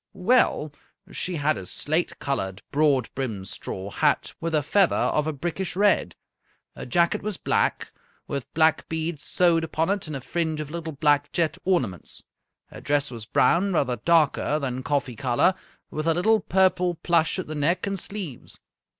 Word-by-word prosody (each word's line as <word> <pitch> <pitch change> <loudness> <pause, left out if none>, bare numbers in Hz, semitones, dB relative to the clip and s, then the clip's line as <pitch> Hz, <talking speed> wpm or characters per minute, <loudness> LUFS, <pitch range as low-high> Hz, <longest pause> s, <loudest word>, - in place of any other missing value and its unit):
"Well, 180 - +2 0.4
she 180 - -2
had 145 -7 +1
a 95 - -8
slate 155 - -2
colored, 95 -8 -3
broad 140 -4 +2
brimmed 110 -8 -4
straw 95 +1 -6
hat, - - +1
with 165 -1 -1
a 150 - +2
feather 190 +5 +3
of 150 0 +1
a - - +1
brickish 175 +4 -3
red. 200 - +2 0.6
Her - - -7
jacket 170 +7 +2
was 210 -2 -1
black, - - 0 0.4
with 140 -4 -5
black 160 0 +3
beads 160 -1 -2
sewed 170 -2 +2
upon 165 +2 0
it 200 -4 -2
and 155 - -5
a 135 - -5
fringe 160 +2 -2
of 150 -1 -5
little 165 -1 -5
black 145 0 +2
jet 165 -2 0
ornaments. 125 - -1 0.5
Her - - -10
dress 145 -1 0
was 115 -3 -8
brown, 190 +9 +3
rather 130 -6 +1
darker 155 +1 +2
than 130 -4 -3
coffee 135 -3 -1
color, 130 +7 +2 0.4
with 155 +1 -3
a 165 - +3
little 220 +5 +3
purple 185 -2 +2
plush 165 0 +1
at 185 - -3
the 155 - -6
neck 160 +5 0
and 195 -1 -2
sleeves. 180 - -6
155 Hz, 170 wpm, -25 LUFS, 140-175 Hz, 0.6 s, feather